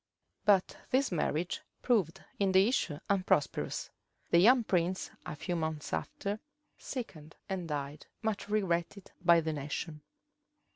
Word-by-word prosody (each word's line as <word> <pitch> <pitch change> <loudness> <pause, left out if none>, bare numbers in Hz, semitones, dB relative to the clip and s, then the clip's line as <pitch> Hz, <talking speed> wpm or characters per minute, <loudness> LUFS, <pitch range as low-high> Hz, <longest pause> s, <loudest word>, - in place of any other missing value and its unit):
But 195 -3 +4
this 265 -1 +2
marriage 170 0 -1 0.2
proved 190 -8 +1 0.2
in 195 -2 +2
the 190 +2 +6
issue 190 - 0
unprosperous. 185 -7 +1 0.4
The 170 - +7
young 240 +6 +7
prince, 180 -2 0 0.2
a - - -4
few 175 +4 -3
months 160 - -3
after, 200 - -2 0.4
sickened 160 - -7
and 190 -3 -3
died, 145 -1 -4 0.2
much 215 -2 -2
regretted 190 -2 -1
by 170 -1 +6
the 160 0 -2
nation. 150 +2 -4
180 Hz, 130 wpm, -32 LUFS, 155-200 Hz, 0.4 s, The